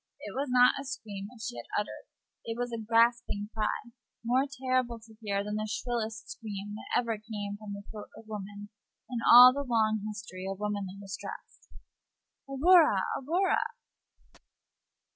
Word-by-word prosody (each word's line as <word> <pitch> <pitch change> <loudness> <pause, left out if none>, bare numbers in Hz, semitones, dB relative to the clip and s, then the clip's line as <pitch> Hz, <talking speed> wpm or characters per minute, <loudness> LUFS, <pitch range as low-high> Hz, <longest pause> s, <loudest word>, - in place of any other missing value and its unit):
It - - -7
was 280 +2 -2
not 250 0 +6
a - - -7
scream 210 -8 -6
which 230 -1 -12
she 120 - -4
had 120 - -7
uttered. 210 - -6 0.4
It 225 0 -4
was 245 0 -2
a 230 - -3
gasping 230 -2 +2
cry, 220 +2 -2 0.3
more 255 +3 +3
terrible 255 -2 0
to 220 0 -17
hear 200 -2 -1
than 210 +1 -3
the 215 0 -3
shrillest 220 -1 -3
scream 205 -2 -6
that 215 - -1
ever 230 -3 -2
came 210 -2 -5
from 210 -2 -7
the 200 0 -7
throat 210 -1 -9
of 225 - -13
woman 205 -1 -7 0.4
in 240 - -1
all 250 +1 +11
the 285 - -2
long 220 -5 +1
history 205 -3 -7
of 195 - -4
womanly 205 -2 -3
distress. 195 -1 -9 0.8
"Aurora! 300 - +5 0.2
Aurora!" 350 +8 +1
220 Hz, 160 wpm, -30 LUFS, 205-245 Hz, 0.8 s, all